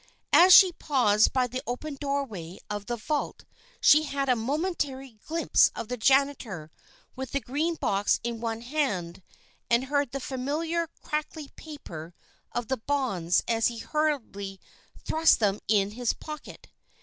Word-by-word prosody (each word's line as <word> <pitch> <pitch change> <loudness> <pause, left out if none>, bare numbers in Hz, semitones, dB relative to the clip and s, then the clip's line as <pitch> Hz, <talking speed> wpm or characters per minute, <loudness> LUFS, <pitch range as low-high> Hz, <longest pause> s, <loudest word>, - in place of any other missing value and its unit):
As 360 +2 +8
she 370 0 +9
paused 245 -10 +2
by 255 -1 +2
the 255 +1 -4
open 285 +5 -4
doorway 270 - -4
of 205 -1 -4
the 240 - -1
vault 290 +6 -3 0.3
she 300 - +6
had 280 -3 -2
a 250 - +5
momentary 270 - -3
glimpse 330 +1 +3
of 215 - -6
the 250 - -2
janitor 250 - +1 0.4
with 265 -1 -6
the 280 - +1
green 300 +6 -2
box 200 -9 +1
in 235 -1 -4
one 225 -1 -3
hand, 235 - -2 0.5
and 235 +2 +3
heard 285 -1 0
the 275 - -4
familiar 305 +6 -2 0.2
crackly 300 -1 -4
paper 175 - -10 0.4
of 240 -2 -3
the 265 - -1
bonds 220 -10 0
as 225 -1 +2
he 235 - -4
hurriedly 225 -10 -2 0.5
thrust 320 +1 +4
them 205 -2 +1
into 205 0 +1
his 245 -2 0
pocket. 305 -1 -10
260 Hz, 150 wpm, -27 LUFS, 220-295 Hz, 0.5 s, she